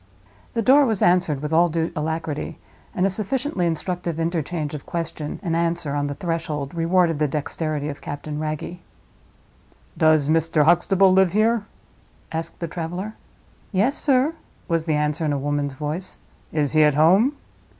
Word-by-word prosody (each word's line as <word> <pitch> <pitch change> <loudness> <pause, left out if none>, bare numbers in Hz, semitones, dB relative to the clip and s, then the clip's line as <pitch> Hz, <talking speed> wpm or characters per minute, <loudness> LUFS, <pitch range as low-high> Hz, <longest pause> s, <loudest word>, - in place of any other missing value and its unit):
The 230 - +1
door 275 +4 +6
was 220 -4 0
answered 175 -5 +2
with 150 +1 -3
all 170 +2 +5
due 165 +1 -1
alacrity, 160 0 -3 0.4
and 180 - +2
a - - +3
sufficiently 215 - -1
instructive 170 0 -3
interchange 165 -2 -2
of 150 - -7
question 160 -3 -4
and 165 -3 -1
answer 170 -3 0
on 145 0 0
the 145 - -4
threshold 160 -4 -3
rewarded 170 -1 +2
the 150 - +2
dexterity 150 +1 -3
of 145 -1 -6
Captain 150 +1 -5
Wragge. 155 +3 -4 1.2
"Does 155 -2 +4
Mr. 160 0 +3
Huxtable 185 +4 +4
live 190 -2 +4
here?" 215 0 +2 0.6
asked 165 +2 -5
the 170 - -1
traveler. 175 +6 -5 0.6
"Yes, 215 +8 +2
sir," 275 +1 +2 0.3
was 165 -2 0
the 155 -2 +1
answer, 150 +2 0
in 150 -2 +1
a - - 0
woman's 145 0 -2
voice. 155 +6 -3 0.3
"Is 150 -3 0
he 155 - +5
at 150 -2 +4
home?" 195 - +4
165 Hz, 160 wpm, -23 LUFS, 150-180 Hz, 1.2 s, door